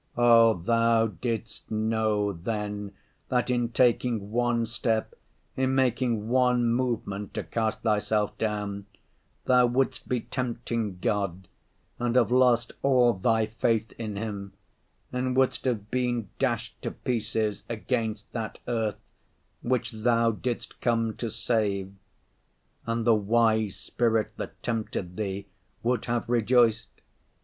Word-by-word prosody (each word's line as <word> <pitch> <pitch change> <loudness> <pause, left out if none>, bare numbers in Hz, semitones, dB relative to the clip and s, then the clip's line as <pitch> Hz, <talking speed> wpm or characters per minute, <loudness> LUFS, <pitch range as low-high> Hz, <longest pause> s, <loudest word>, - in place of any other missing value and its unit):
Oh, 115 -2 +6
Thou 115 +4 +3 0.2
didst 115 -2 -4
know 110 -2 +1
then 105 +2 -4 0.4
that 125 0 +1
in 120 -1 +1
taking 120 -3 +1
one 120 0 +1
step, 115 -1 -1 0.4
in 130 0 +1
making 120 -4 +1
one 125 -1 +3
movement 115 -5 -2
to - - -2
cast 110 -1 -2
Thyself 105 -1 +1
down, 105 -2 -2 0.6
Thou 125 -1 +5
wouldst 130 +2 -1
be 125 -2 0
tempting 115 -5 -3
God 95 -3 -1 0.5
and 120 0 0
have 120 -3 +4
lost 125 -2 +4
all 125 -3 +4
Thy 110 +3 +2
faith 110 0 0
in 110 -3 -4
Him, 100 -2 -5 0.6
and 125 0 -1
wouldst 130 0 +2
have 110 -5 -1
been 120 -4 0
dashed - - -1
to - - -2
pieces 110 -3 -2
against 110 -2 -2
that 115 -2 -4
earth 115 -4 -1 0.6
which 125 -1 0
Thou 115 +1 +2
didst 120 +2 -4
come 115 -2 +1
to 115 - -3
save. 100 -4 -1 0.9
And 115 0 -1
the 115 - +6
wise 110 -1 +2
spirit 115 -2 0
that - - -7
tempted 110 -6 -3
Thee 100 -1 -3 0.4
would 120 -1 0
have 120 0 -1
rejoiced. 115 -1 +3
115 Hz, 125 wpm, -27 LUFS, 105-120 Hz, 0.9 s, Oh